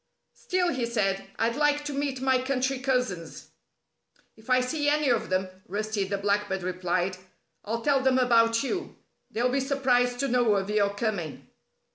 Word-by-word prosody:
"Still," 365 -1 0
he 250 -3 -1
said, 195 -4 -1
"I'd 230 +1 +1
like 295 0 +1
to 295 - -3
meet 275 -2 -2
my 260 -1 +2
country 260 0 -1
cousins." 250 - -2 0.9
"If 220 +2 -18
I 255 0 +5
see 290 +4 0
any 300 -1 +2
of 230 -2 +1
them," 185 0 0 0.2
Rusty 210 +1 -2
the 200 +1 -2
Blackbird 200 -1 0
replied, 185 0 -1 0.5
"I'll 230 +2 -3
tell 285 -2 +3
them 260 -1 +3
about 230 -2 +4
you. 360 +7 -3 0.3
They'll 240 +3 0
be 270 +2 +1
surprised 250 -3 +1
to 275 - +1
know 240 -4 +3
of 195 +1 -1
your 205 -1 +2
coming." 200 -8 -3
240 Hz, 165 wpm, -27 LUFS, 200-265 Hz, 0.9 s, I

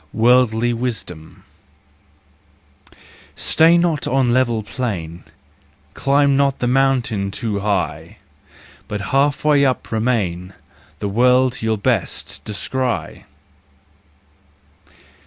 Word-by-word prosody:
Worldly 120 0 +3
Wisdom. 110 -10 -6 1.9
Stay 165 +2 +3
not 170 -4 0
on 130 -2 +1
level 120 -3 +1
plain, 90 -9 -5 0.7
Climb 140 +1 +2
not 140 -1 +1
the - - -2
mount 135 -1 +1 0.2
too 105 0 -3
high, 100 -3 -3 0.7
But 105 -1 -4
half 140 +2 +1
way 145 -2 +4
up 130 -3 -1
remain— 100 -6 -1 0.4
The 100 - -4
world 125 +4 +2
you'll 110 -1 0
best 100 - -2
descry! 125 +4 -4
125 Hz, 90 wpm, -19 LUFS, 105-135 Hz, 1.9 s, way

